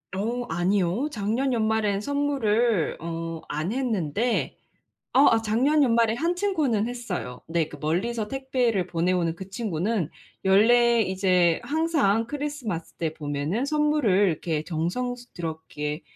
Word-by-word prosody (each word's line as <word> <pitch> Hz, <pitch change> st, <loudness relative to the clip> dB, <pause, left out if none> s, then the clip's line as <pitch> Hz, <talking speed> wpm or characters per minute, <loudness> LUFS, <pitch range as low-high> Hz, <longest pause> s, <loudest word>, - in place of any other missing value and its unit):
어 235 Hz, +5 st, -2 dB
아니요. 185 Hz, -, 0 dB
작년 230 Hz, +6 st, -1 dB
연말에는 220 Hz, -3 st, +1 dB
선물을 240 Hz, -, +1 dB
어 165 Hz, 0 st, -5 dB
안 155 Hz, +8 st, -2 dB
했는데 230 Hz, -, -1 dB, 0.6 s
어 275 Hz, +3 st, +6 dB
아 225 Hz, -, +3 dB
작년 250 Hz, +8 st, +2 dB
연말에 230 Hz, -3 st, +3 dB
1 335 Hz, +5 st, 0 dB
친구는 305 Hz, -, 0 dB
했어요. 210 Hz, -, -5 dB
네 165 Hz, -1 st, 0 dB
그 150 Hz, -, -10 dB
멀리서 210 Hz, +9 st, -1 dB
택배를 250 Hz, -7 st, 0 dB
보내오는 170 Hz, -1 st, 0 dB
그 190 Hz, +1 st, -8 dB
친구는 195 Hz, -4 st, -1 dB, 0.3 s
연례 235 Hz, +5 st, +5 dB
이제 185 Hz, -3 st, +2 dB
항상 295 Hz, -9 st, +1 dB
크리스마스 280 Hz, -, -4 dB
때 160 Hz, -2 st, -3 dB
보면은 150 Hz, -, -2 dB
선물을 300 Hz, -5 st, +2 dB, 0.2 s
이렇게 160 Hz, -1 st, -2 dB
정성스럽게 165 Hz, -5 st, -4 dB
215 Hz, 270 characters per minute, -25 LUFS, 170-245 Hz, 0.6 s, 어